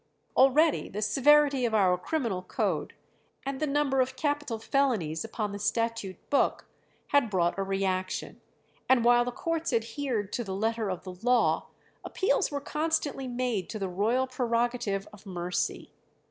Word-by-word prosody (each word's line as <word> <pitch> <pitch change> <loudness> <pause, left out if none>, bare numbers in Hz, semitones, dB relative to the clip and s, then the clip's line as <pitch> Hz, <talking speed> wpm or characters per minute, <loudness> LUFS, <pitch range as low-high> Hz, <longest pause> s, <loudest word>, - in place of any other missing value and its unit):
Already 285 +4 +4
the 205 - -5
severity 275 +4 +4
of 230 -2 +1
our 185 -4 +4
criminal 215 - -2
code, - - -2 0.5
and 275 -1 -3
the 305 - 0
number 275 -2 +2
of 255 0 -1
capital 290 -5 -1
felonies 220 - 0
upon 210 -3 -3
the 200 - -6
statute 220 -3 -2
book, 285 - +2 0.4
had 285 -5 +3
brought 180 -1 +1
a - - +1
reaction; 190 -1 -2 0.5
and 250 -3 +4
while 240 0 +6
the 245 - -3
courts 330 +4 -2
adhered 230 -2 -2
to 240 - -1
the 190 -3 -5
letter 220 +1 -1
of 185 -2 -4
the 185 - -7
law, 240 +6 +2 0.4
appeals 380 -1 +1
were 285 - -3
constantly 300 -2 -1
made 245 -6 -2
to 220 - -4
the 195 -2 -2
royal 220 +8 +1
prerogative 240 -5 -1
of 210 0 -14
mercy. 180 -1 -3
235 Hz, 155 wpm, -28 LUFS, 195-270 Hz, 0.5 s, while